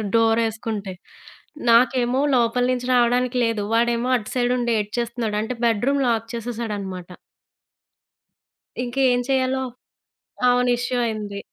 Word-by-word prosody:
డోరేసుకుంటే. 225 Hz, -3 st, 0 dB, 0.8 s
నాకేమో 250 Hz, +1 st, +3 dB, 0.2 s
లోపల 240 Hz, +1 st, +2 dB
నుంచి 250 Hz, -1 st, -2 dB
రావడానికి 245 Hz, +1 st, +2 dB
లేదు, 225 Hz, -2 st, -1 dB
వాడేమో 235 Hz, +1 st, +1 dB
అటు 215 Hz, -, -8 dB
సైడ్ 245 Hz, 0 st, +1 dB
ఉండి 240 Hz, -1 st, -1 dB
ఏడ్చేస్తున్నాడు. 225 Hz, 0 st, -3 dB
అంటే, 230 Hz, +3 st, -4 dB
బెడ్రూమ్ 240 Hz, +5 st, +1 dB
లాక్ 230 Hz, -1 st, 0 dB
చేసేశాడనమాట. 210 Hz, -6 st, -5 dB, 1.7 s
ఇంకేం 250 Hz, 0 st, +1 dB
చేయాలో 265 Hz, 0 st, +1 dB, 0.9 s
అవును. 245 Hz, 0 st, +3 dB
ఇష్యూ 250 Hz, +1 st, -2 dB
అయింది. 210 Hz, -2 st, -4 dB
235 Hz, 105 wpm, -22 LUFS, 225-250 Hz, 1.7 s, నాకేమో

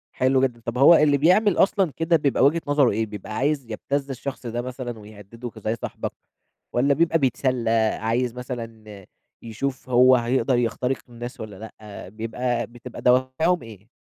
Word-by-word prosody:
حلو 130 Hz, +1 st, +2 dB
جدًا، 125 Hz, -3 st, -1 dB
طب 115 Hz, +1 st, -3 dB
هو 140 Hz, +6 st, +8 dB
اللي 150 Hz, -2 st, +4 dB
بيعمل 180 Hz, +6 st, +3 dB
أصلًا 195 Hz, -3 st, +3 dB
كده 165 Hz, +1 st, +2 dB
بيبقى 145 Hz, -5 st, +2 dB
وجهة 160 Hz, +4 st, +3 dB
نظره 145 Hz, -3 st, +3 dB
إيه، 110 Hz, +2 st, -1 dB
بيبقى 105 Hz, 0 st, -8 dB
عايز 140 Hz, +2 st, 0 dB
يبتز 140 Hz, +5 st, -3 dB
الشخص 135 Hz, 0 st, -6 dB
ده 120 Hz, +1 st, -3 dB
مثلًا 125 Hz, -2 st, -6 dB
ويهدده 105 Hz, +3 st, -10 dB
ك -, -, -13 dB
زي 110 Hz, +1 st, -2 dB
صاحبك، -, -, -5 dB, 0.6 s
والّا 135 Hz, +4 st, +3 dB
بيبقى 165 Hz, +2 st, +2 dB
بيتسلى، 130 Hz, -3 st, 0 dB, 0.3 s
عايز 115 Hz, +2 st, 0 dB
مثلًا 115 Hz, -5 st, -8 dB, 0.4 s
يشوف 130 Hz, +4 st, -5 dB
هو 125 Hz, +1 st, +6 dB
هيقدر 125 Hz, +1 st, +1 dB
يخترق 120 Hz, +2 st, -1 dB
الناس 120 Hz, +1 st, -8 dB
والّا 110 Hz, -2 st, -8 dB, 0.2 s
لأ، 105 Hz, -4 st, -10 dB
بيبقى 120 Hz, +3 st, -3 dB
بتبقى 120 Hz, +1 st, -10 dB
دوافعهم 130 Hz, +8 st, +2 dB
إيه؟ 110 Hz, -2 st, -13 dB
125 Hz, 165 wpm, -23 LUFS, 115-140 Hz, 0.6 s, هو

